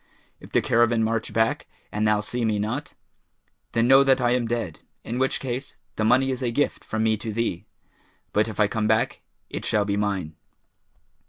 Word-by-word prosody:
If - - -14
the - - +2
caravan 115 -1 +3
march 115 0 -1
back 110 0 +1 0.2
and 105 +1 0
thou 105 -1 +3
see 120 +3 -3
me 110 -2 +1
not, 110 +8 -3 0.8
then 115 +1 +2
know 135 +1 +7
that 135 -1 +4
I 120 -1 +2
am 125 -2 +1
dead, 115 -9 -3 0.2
in 120 +2 -4
which 130 0 +1
case 130 +1 -5 0.2
the 110 - -1
money 130 +4 +3
is 130 - -3
a 125 - 0
gift 145 +5 -1
from 110 0 -2
me 110 -1 +2
to 110 +1 -5
thee; 105 -3 -2 0.7
but 105 +2 +3
if 110 - -7
I 105 - +5
come 110 0 -1
back, 110 +1 +1 0.3
it - - -4
shall 105 -1 +1
be 100 0 -1
mine.' 95 -6 -2
115 Hz, 195 wpm, -25 LUFS, 105-125 Hz, 0.8 s, know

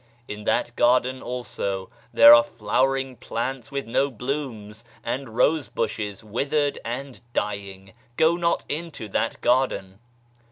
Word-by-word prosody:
In 105 0 -7
that 120 - 0
garden, 130 +1 +2
also, 100 -6 -4 0.2
there 115 - +9
are 120 - +9
flowering 130 +4 0
plants 125 +2 -4
with 140 0 -3
no 135 +5 +1
blooms, 120 -4 -5 0.2
and 130 +2 -3
rose 150 +3 +3
bushes 105 -1 -3
withered 140 +7 -1
and 125 +2 -6
dying 100 -2 -4 0.2
Go 160 +1 +4
not 170 -1 0
into 155 -7 -4
that 115 +3 -1
garden 110 -7 +1
125 Hz, 125 wpm, -24 LUFS, 105-135 Hz, 0.2 s, there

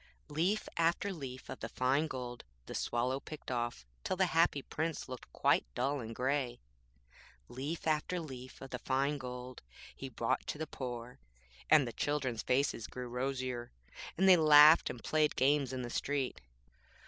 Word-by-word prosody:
Leaf 180 +8 0
after 170 +4 +1
leaf 130 -6 -7
of - - -7
the - - -5
fine 135 +5 +1
gold 125 -4 -6 0.2
the - - -7
Swallow 125 +3 0
picked 150 -2 -8
off, 120 - -2 0.2
till - - -1
the 190 - +4
Happy 165 -4 +2
Prince 160 0 -3
looked 130 -1 -9
quite - - +3
dull 140 +3 0
and 115 -2 -6
grey. 130 -1 -1 0.9
Leaf 145 +6 -5
after 160 +3 0
leaf 130 -5 -9
of 135 - -9
the 125 - -4
fine 140 +3 0
gold 125 0 -7 0.3
he - - -7
brought - - -1
to - - -3
the 160 - -3
poor, 125 -4 -6 0.5
and 150 -5 +6
the 120 - -5
children's 135 -6 -1
faces 125 -3 0
grew 125 -1 -6
rosier, 125 -1 -3 0.5
and 190 +3 +4
they 185 -2 +9
laughed 155 0 +8
and 120 - -7
played 155 -1 +2
games 140 0 +3
in 130 -1 -3
the 120 - -5
street. 140 -1 -2
135 Hz, 165 wpm, -33 LUFS, 125-155 Hz, 0.9 s, they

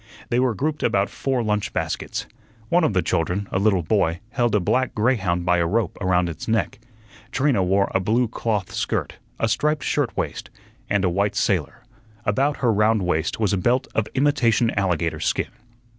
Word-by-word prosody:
They 120 - +2
were 125 -3 +2
grouped 150 +5 -2
about 100 0 +1
four 130 -3 -1
lunch 105 -2 -1
baskets. - - -3 0.4
One 175 0 +3
of 140 - +2
the 90 -3 +2
children, 90 +4 -1
a 95 - 0
little 100 -3 +2
boy, 85 -2 +1
held 120 -3 +1
a - - +4
black 130 +8 0
greyhound 100 -7 +1
by 90 0 +3
a 85 - +1
rope 105 0 0
around 90 -2 +2
its 85 -1 -6
neck. 115 0 0 0.5
Trina 135 -6 +2
wore 95 +2 +2
a - - +3
blue 115 +6 +1
cloth 105 -4 -2
skirt, - - -2 0.2
a 115 - +2
striped 150 +7 0
shirt 145 -6 -1
waist, - - -3 0.4
and 100 -1 +2
a - - +3
white 100 +3 0
sailor; 100 - -1 0.4
about 135 +7 +1
her 115 - +4
round 105 0 +2
waist 80 -1 -1
was 105 -3 +1
a - - +2
belt 120 +7 +1
of 110 - 0
imitation 120 -5 +2
alligator 90 -5 0
skin. - - -1
105 Hz, 185 wpm, -23 LUFS, 90-120 Hz, 0.5 s, a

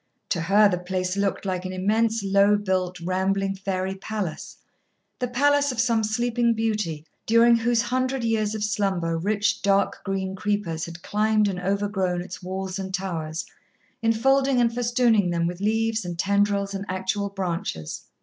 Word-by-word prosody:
To 180 -5 0
her 200 +5 +5
the 180 -3 -1
place 180 0 -2
looked 200 0 -1
like 185 -2 -2
an 185 - -4
immense, 220 +4 +1
low 200 +1 +4
built, 185 -3 -1
rambling 190 +2 0
fairy 190 -1 -2
palace 195 -3 -5 0.6
the 250 - -1
palace 285 +3 +2
of 250 - -5
some 230 -2 +2
sleeping 235 +2 +1
beauty 210 -9 -2 0.2
during 230 +1 +6
whose 230 0 +1
hundred 255 +2 -1
years 220 -2 0
of 215 - -3
slumber 195 -5 0
rich 205 +5 0
dark 200 0 +1
green 190 -1 -2
creepers 200 -5 -2
had 170 0 -10
climbed 215 0 +2
and 190 -3 -2
overgrown 195 -1 -1
its 180 0 -9
walls 190 +1 -4
and 190 -1 -3
towers, 165 -4 -4 0.6
enfolding 265 +4 +3
and 235 -1 +2
festooning 235 -5 +2
them 170 -1 0
with 175 +2 -4
leaves 225 +1 +1
and 175 -1 -5
tendrils 200 +1 +1
and 195 0 -3
actual 190 +2 -1
branches. 170 - -4
200 Hz, 160 wpm, -24 LUFS, 185-225 Hz, 0.6 s, during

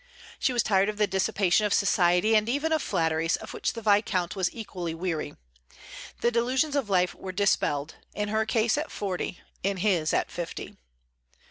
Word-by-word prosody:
She - - +2
was 240 -2 +1
tired 195 0 +2
of 210 - -4
the 210 - +3
dissipation 190 0 +1
of 205 - +2
society 180 +2 +3
and 215 +1 +3
even 290 +5 0
of 315 - +2
flatteries, 165 0 +1
of - - -8
which - - -2
the 230 - -7
Viscount 200 -4 +2
was 185 -2 +1
equally 180 -7 -5
weary. 165 -2 -3 0.9
The 235 - +3
delusions 255 +5 +1
of 270 -7 -1
life 180 -2 +2
were 190 - -7
dispelled, 165 -6 0 0.2
in 210 0 -2
her 220 +1 0
case, 225 +4 +2
at 310 - -4
forty; 185 -2 -4 0.2
in 195 0 -1
his, 180 -5 +1
at - - 0
fifty. 175 -1 -6
200 Hz, 175 wpm, -27 LUFS, 180-220 Hz, 0.9 s, the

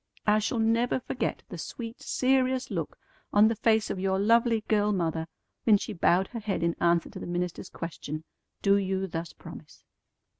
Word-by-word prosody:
I 210 0 +4
shall 215 +3 -1
never 230 +3 +2
forget - - -3
the - - -7
sweet, 230 -1 -7
serious 260 -1 +1
look 165 -6 -3 0.3
on 210 +1 +6
the 225 - 0
face 220 0 +2
of - - -3
your 190 0 +1
lovely 230 +2 +3
girl 210 -1 +1
mother 165 -4 -1 0.4
when 215 -3 +6
she - - -5
bowed 175 +3 +2
her 235 - -5
head 205 -5 -2
in 170 0 +1
answer 170 -1 +2
to - - -8
the - - -6
minister's 175 0 -3
question, 155 -2 -6 0.4
'Do 200 0 +5
you 190 -1 -1
thus 165 -2 -5
promise?'" - - -12
205 Hz, 180 wpm, -28 LUFS, 175-225 Hz, 0.4 s, on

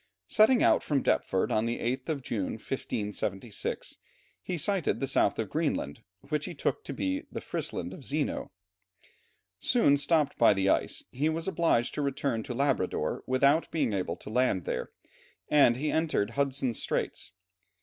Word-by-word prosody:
Setting 220 - +4
out - - +5
from 140 -3 0
Deptford 95 - +1
on 110 +2 +1
the 120 - -1
8th 130 +5 -2
of 145 -4 -2
June, 105 -6 -2
1576, 105 -3 -4 0.4
he 180 - -3
sighted 185 +2 0
the 135 - -1
south 135 - +2
of - - -3
Greenland, 70 - -1 0.3
which 150 0 -1
he 175 - -6
took - - -1
for 140 - -6
the 95 -6 -2
Frisland - - -4
of - - -10
Zeno. - - -2 1.1
Soon 145 - +4
stopped 150 0 +1
by 115 -3 +6
the 95 0 +1
ice, - - 0
he 145 +5 0
was 165 +2 -2
obliged 165 -9 +1
to - - -2
return 140 -4 -1
to 120 +2 -6
Labrador 135 -8 0
without 140 +5 +3
being 140 -9 0
able 90 -3 -1
to 105 - -10
land 115 -7 +1
there, - - -3 0.6
and 140 -5 +5
he 150 +3 -1
entered 155 -10 0
Hudson's 135 -3 -1
Straits. - - -2
135 Hz, 160 wpm, -29 LUFS, 110-150 Hz, 1.1 s, by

